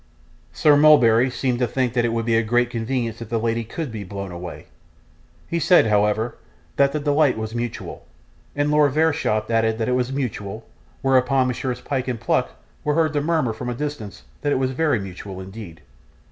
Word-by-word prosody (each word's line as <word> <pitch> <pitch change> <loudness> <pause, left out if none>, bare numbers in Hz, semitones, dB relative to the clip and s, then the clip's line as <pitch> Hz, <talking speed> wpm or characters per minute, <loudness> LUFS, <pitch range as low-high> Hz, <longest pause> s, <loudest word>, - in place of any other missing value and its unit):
Sir 150 -2 +4
Mulberry 130 -5 +6
seemed 125 -1 -1
to 125 - +1
think 125 0 -1
that 120 -2 +1
it 120 - 0
would 115 -1 -1
be 115 -1 +2
a 115 - +4
great 120 +2 +1
convenience 115 -1 -3
if 115 - -7
the 115 - 0
lady 115 +1 -1
could 135 +5 -5
be 110 -2 -6
blown 100 0 -6
away. 90 0 -8 0.8
He 170 - -1
said, 175 -1 +5
however, 105 +2 +1 0.4
that 140 0 +4
the 150 - -2
delight 145 -2 +2
was 110 0 -4
mutual, 120 0 -5 0.5
and 145 +1 +1
Lord 150 -2 +4
Verisopht 145 -9 +1
added 110 -1 +2
that 115 - -2
it - - 0
was 125 0 -1
mutual, 110 -5 -4 0.4
whereupon 130 0 +3
Messrs 125 0 -3
Pyke 135 -2 -3
and 125 -3 -2
Pluck 60 - 0 0.3
were 150 - 0
heard 160 -1 +2
to 145 - +1
murmur 155 -6 0
from 120 +3 -7
the 120 - -2
distance 145 -7 -6 0.2
that 145 - 0
it - - +2
was 130 0 0
very 145 -3 +1
mutual 95 0 -8
indeed. 95 -3 -9
120 Hz, 195 wpm, -22 LUFS, 110-140 Hz, 0.8 s, Mulberry